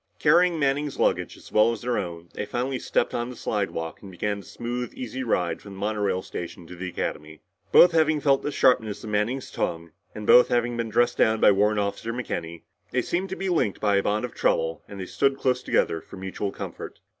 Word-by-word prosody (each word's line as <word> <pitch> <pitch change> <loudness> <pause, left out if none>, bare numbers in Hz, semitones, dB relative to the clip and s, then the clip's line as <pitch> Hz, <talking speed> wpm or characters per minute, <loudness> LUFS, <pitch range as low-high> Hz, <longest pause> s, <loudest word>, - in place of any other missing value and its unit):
Carrying 170 +3 +4
Manning's 145 0 0
luggage - - 0
as - - -15
well 110 +2 +5
as 115 -2 -6
their 125 0 0
own, 85 -3 -6
they - - -3
finally 130 +2 -2
stepped - - 0
on 120 +1 -2
the 125 - -8
slidewalk 95 -8 -3
and 100 - -10
began 100 +3 -2
the 100 - -12
smooth 120 0 -4
easy 130 +1 -5
ride 90 -8 0
from 100 - -10
the 95 - -10
monorail 100 -3 -1
station 85 0 -7
to 90 - -10
the 90 +1 -5
Academy. 75 -2 -5 0.3
Both 175 - +8
having 155 -2 +3
felt 140 -2 +3
the 145 - -3
sharpness 110 -7 +2
of 110 - -6
Manning's 115 +6 -1
tongue, 85 0 -3 0.2
and 105 - -6
both 125 - +7
having 120 0 +1
been 115 -1 -2
dressed 120 +2 +2
down 110 0 +4
by - - +6
Warrant 105 +2 +2
Officer 100 +3 -2
McKenny, 85 -9 -5 0.3
they 125 0 0
seemed 185 +8 -2
to 190 - -3
be 195 - -3
linked 160 - +1
by 100 -1 +2
a - - +3
bond 105 +4 0
of 125 - -8
trouble 80 -1 0
and 100 - -9
they 95 - -4
stood 135 +8 +1
close 125 -2 +1
together 80 -9 +1
for - - -12
mutual 95 +1 -4
comfort. - - -8
110 Hz, 220 wpm, -25 LUFS, 95-125 Hz, 0.3 s, Both